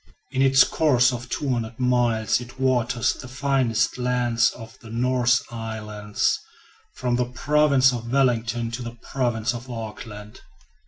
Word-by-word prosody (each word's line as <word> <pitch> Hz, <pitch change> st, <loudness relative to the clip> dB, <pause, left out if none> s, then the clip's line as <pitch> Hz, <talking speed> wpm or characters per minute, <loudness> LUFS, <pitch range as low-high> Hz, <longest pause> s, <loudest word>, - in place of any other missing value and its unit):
In 130 Hz, -1 st, 0 dB
its 135 Hz, -1 st, +6 dB
course 130 Hz, -5 st, +3 dB
of 125 Hz, +1 st, -6 dB
200 120 Hz, -5 st, -2 dB
miles 120 Hz, -3 st, +2 dB
it 120 Hz, +2 st, -12 dB
waters 125 Hz, -2 st, +1 dB
the 130 Hz, -, -10 dB
finest 125 Hz, -3 st, 0 dB
lands 120 Hz, -2 st, +2 dB
of 115 Hz, -1 st, -11 dB
the 115 Hz, -, -13 dB
North 125 Hz, +1 st, +2 dB
Island, 105 Hz, -2 st, -7 dB, 0.8 s
from 125 Hz, -1 st, -1 dB
the 125 Hz, -, +1 dB
province 140 Hz, -1 st, +3 dB
of 115 Hz, -1 st, -5 dB
Wellington 120 Hz, -3 st, +1 dB
to 120 Hz, +2 st, -5 dB
the 120 Hz, -1 st, -7 dB
province 120 Hz, -3 st, -1 dB
of 120 Hz, +2 st, -8 dB
Auckland. 105 Hz, -2 st, -8 dB
120 Hz, 140 wpm, -24 LUFS, 115-130 Hz, 0.8 s, its